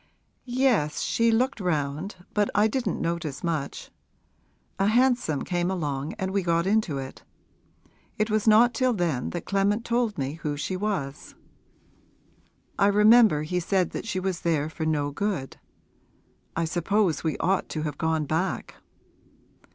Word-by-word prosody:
'Yes; 245 - +1
she 230 0 +2
looked 250 +3 +1
round, 155 +1 -2 0.2
but 205 -1 +1
I 210 +2 +5
didn't 245 +3 -2
notice 165 -4 -3
much. 160 -5 -3 0.9
A 195 - +3
hansom 240 - +2
came 175 -1 -1
along 150 -5 -3
and 190 0 -3
we 200 0 +1
got 170 -1 +1
into 195 -7 +1
it. 135 -1 -7 1.0
It 215 +1 0
was 215 0 0
not 230 +3 +6
till 255 +2 +1
then 165 - -1
that 175 - -5
Clement 200 +3 +1
told 235 -3 0
me 140 +3 -3
who 145 -2 -2
she 185 +6 -3
was: 185 -8 -4 1.4
I 200 - +5
remember 210 -5 +5
he 180 +4 -1
said 180 0 0
that - - -5
she 190 -5 -1
was 185 -2 -2
there 155 -2 0
for 160 +1 -3
no 145 -2 0
good. 175 -4 -3 1.0
I 165 - 0
suppose 175 +1 0
we 160 -2 -1
ought 190 +2 0
to 155 - -3
have 150 -1 -4
gone 160 -1 0
back.' 160 +6 -2
180 Hz, 150 wpm, -26 LUFS, 155-215 Hz, 1.4 s, not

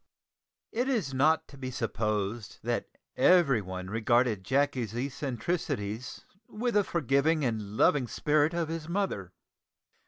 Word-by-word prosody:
It 245 +4 0
is 205 - 0
not 155 +4 +3
to 140 - -13
be 130 -1 -4
supposed 110 -3 -2
that - - -2 0.3
everyone 110 - +3
regarded 115 -2 +2
Jacky's 125 -2 0
eccentricities 125 - -3 0.2
with 240 +3 -2
the 205 - +4
forgiving 150 -1 +1
and 110 -3 -3
loving 135 -4 +4
spirit 150 +5 +1
of 170 -2 0
his 165 0 -5
mother. 170 - -2
135 Hz, 120 wpm, -29 LUFS, 110-160 Hz, 0.3 s, the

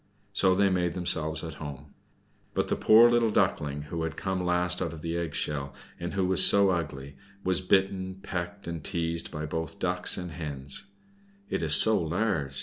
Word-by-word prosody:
So 95 -1 +3
they 100 0 +3
made 90 -2 0
themselves 80 -3 -1
at 80 -1 -8
home. 70 -1 -8 0.6
But - - 0
the - - +1
poor 110 +2 +7
little 120 -1 +3
Duckling, 75 -8 0
who 80 +2 -5
had 80 -1 -4
come 95 -1 -2
last 90 0 +1
out - - -2
of 80 0 -10
its 85 0 -2
egg 85 -3 -3
shell, 70 -2 -3 0.2
and 85 0 -5
who 95 -1 +1
was 95 0 +4
so 100 -1 +6
ugly, 70 -5 -4 0.3
was 95 0 0
bitten, 95 0 +1
pecked, 90 +2 -5
and 85 -2 -6
teased 85 -2 -2
by 75 -1 -5
both 80 +4 -4
Ducks 90 -1 0
and 90 -2 -6
Hens. 70 +1 -1 0.6
"It - - -1
is 80 -2 +3
so 110 +1 +5
large!" 80 -6 -1
85 Hz, 185 wpm, -28 LUFS, 75-95 Hz, 0.6 s, poor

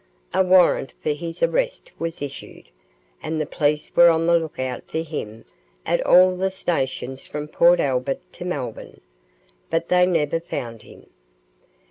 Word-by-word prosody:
A 190 - +3
warrant 180 -6 +3
for - - -1
his 165 +3 -5
arrest - - 0
was 165 -3 -4
issued, 140 -1 -9 0.5
and 160 0 -3
the 155 - 0
police 150 0 -1
were 170 0 +8
on 165 0 +2
the 170 0 +4
look 160 -2 -7
out 130 -1 -3
for - - -4
him 115 -9 -7 0.4
at - - +1
all 185 0 +6
the 190 +1 0
stations 135 -7 -3
from 150 0 -5
Port 170 +3 +4
Albert 135 -2 -1
to - - -8
Melbourne, - - -6 0.7
but 165 +1 -1
they 180 0 +4
never 165 -3 +1
found 115 -9 -6
him. - - -16
165 Hz, 155 wpm, -22 LUFS, 145-175 Hz, 0.7 s, were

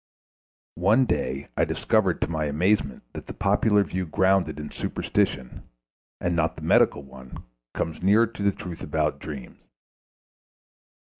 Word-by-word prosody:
One 110 +8 +4
day 70 - -2
I - - +2
discovered 95 -6 +1
to - - +1
my 80 -2 -2
amazement 75 +1 0
that - - -8
the - - -7
popular 105 -2 +3
view 95 -2 -4
grounded 95 -3 +2
in 75 - -7
superstition, 65 -2 -2 0.5
and 85 0 -1
not 80 -1 0
the - - -10
medical 70 - +3
one, 65 -1 -12 0.3
comes 80 -1 -3
nearer 105 +5 +5
to 115 -2 -9
the 100 0 +3
truth 90 -3 -8
about - - -1
dreams. 70 -5 -8
85 Hz, 140 wpm, -25 LUFS, 75-100 Hz, 0.5 s, nearer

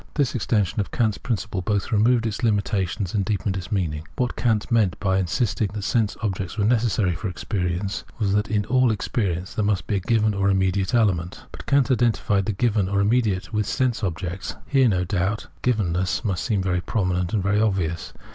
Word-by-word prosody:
This 140 -4 +1
extension 105 -4 0
of 100 - -1
Kant's 110 -4 0
principle 110 -4 -2
both 100 +3 -1
removed 115 +2 +3
its 110 0 -3
limitations 100 -4 0
and 100 -2 +1
deepened 100 -1 -1
its 95 +3 -6
meaning. 80 -6 -2
What 125 -1 -1
Kant 115 -3 0
meant 110 -6 +2
by 95 -1 +1
insisting 95 +2 0
that 105 -2 -4
sense 110 0 0
objects 95 -1 -3
were 105 - +1
necessary 110 -5 +2
for 105 +5 -4
experience, 90 0 -2
was 100 -4 0
that 105 0 +1
in 105 -1 0
all 130 +2 +3
experience 95 -4 -2
there 110 - -1
must 100 -2 0
be 105 - 0
a - - 0
given 110 +2 +1
or 100 0 +1
immediate 95 +3 +1
element. 95 -7 +1
But - - -10
Kant 140 -1 +3
identified 110 -5 +1
the - - +1
given, 105 -2 +1
or 100 0 +1
immediate, 105 -1 +1
with 105 -1 0
sense 125 -4 0
objects. 90 0 -3
Here, 135 -3 +3
no 90 -3 +1
doubt, 95 +3 -1
givermess 95 -4 0 0.2
seems 95 +2 -1
very 90 -1 +1
prominent 90 -4 -1
and 105 -4 0
very 100 +2 +2
obvious. 95 -6 -1
100 Hz, 190 wpm, -23 LUFS, 95-110 Hz, 0.2 s, removed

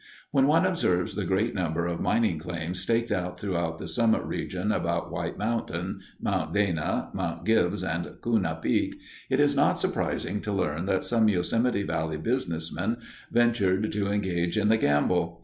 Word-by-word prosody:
When 135 -2 +4
one 165 +4 +4
observes 130 - +1
the 105 -1 -2
great 95 +6 +1
number 85 -2 -1
of 85 -1 -2
mining 110 -9 +1
claims 85 +2 -4
staked 115 +4 0
out 90 0 -1
throughout 85 -5 -2
the - - -6
summit 115 -2 +2
region - - -2
about - - -1
White - - -3
Mountain, 115 +2 -2 0.2
Mount 85 -5 -1
Dana, 95 -7 0
Mount - - -3
Gibbs, 105 -3 +2
and 85 -1 -2
Kuna 100 -9 +1
Peak, - - 0 0.3
it - - +2
is - - +4
not - - +3
surprising 105 +2 -1
to 105 - -3
learn 90 -3 -1
that 95 -1 +1
some 115 -2 +3
Yosemite 105 +4 +1
Valley 80 -4 -2
businessmen 90 - -1 0.3
ventured 110 -4 +2
to 100 -1 -1
engage 90 -4 0
in 105 - +3
the 110 - +5
gamble. 85 +1 +1
95 Hz, 165 wpm, -27 LUFS, 85-110 Hz, 0.3 s, the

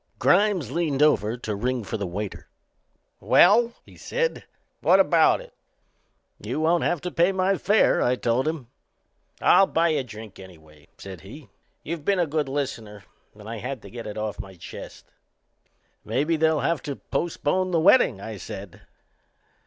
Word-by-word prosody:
Grimes 195 - +2
leaned 150 -3 0
over 115 -6 +2
to 110 -3 -4
ring 125 +3 -2
for - - -5
the 100 -3 -3
waiter. 100 +3 -6 0.7
"Well," 230 +6 +5
he - - -17
said, 485 0 -2 0.3
"what - - +4
about - - +4
it?" - - -15 0.9
"You - - -4
won't 165 +2 +2
have 175 -4 0
to 180 - -4
pay 175 +3 +3
my 190 +1 +1
fare," 210 +3 +3
I 125 - +2
told 125 +3 0
him. 155 -5 -3 0.8
"I'll 195 - +5
buy 165 +1 +1
a 150 -4 0
drink 110 -4 -11
anyway," 80 -5 -16
said 95 -4 -10
he. 130 +9 -12 0.3
"You've 165 -1 -5
been 200 +4 +1
a 175 - +2
good 150 -2 -2
listener 115 -7 -4 0.3
and 105 0 -13
I 115 +1 -5
had 130 +3 -6
to 100 - -12
get 115 -2 -8
it 105 - -7
off 105 -1 -4
my 95 -1 -8
chest." 85 - -10 1.0
"Maybe 150 +5 0
they'll 160 -1 +2
have 155 +1 0
to 140 - -5
postpone 175 +4 -2
the 170 -2 +1
wedding," 165 - +4
I 110 +1 -7
said. - - -9
140 Hz, 165 wpm, -24 LUFS, 105-170 Hz, 1.0 s, Well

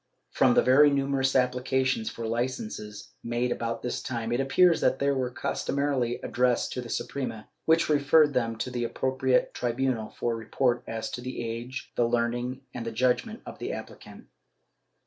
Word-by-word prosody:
From 125 - +4
the - - +5
very 140 +3 +6
numerous 135 -1 +1
applications 125 -1 +1
for 115 - -6
licences 110 -3 -4
made 120 +1 -1
about 115 -1 -3
this 125 - -2
time 115 -3 -3
it 120 - +1
appears 165 +6 +4
that 130 - +3
they 140 +1 +1
were 130 -2 0
customarily 130 -1 -1
addressed 125 -1 +1
to 125 - -3
the 120 - -9
Suprema, 115 -6 -4 0.2
which 160 +1 +4
referred 150 0 +4
them 115 -3 0
to 125 +3 -3
the 120 -1 -2
appropriate 130 +1 +1
tribunal 120 -2 -1
for 120 -1 -2
report 120 +2 0
as 110 0 -4
to 125 - -5
the 125 -1 -5
age, 120 +3 -6
the 120 - +2
learning 120 +2 -1
and 120 - -5
the 115 - -4
judgement 130 - 0
of - - -9
the - - -4
appli - - -6
cant. - - -13
125 Hz, 170 wpm, -27 LUFS, 115-135 Hz, 0.2 s, very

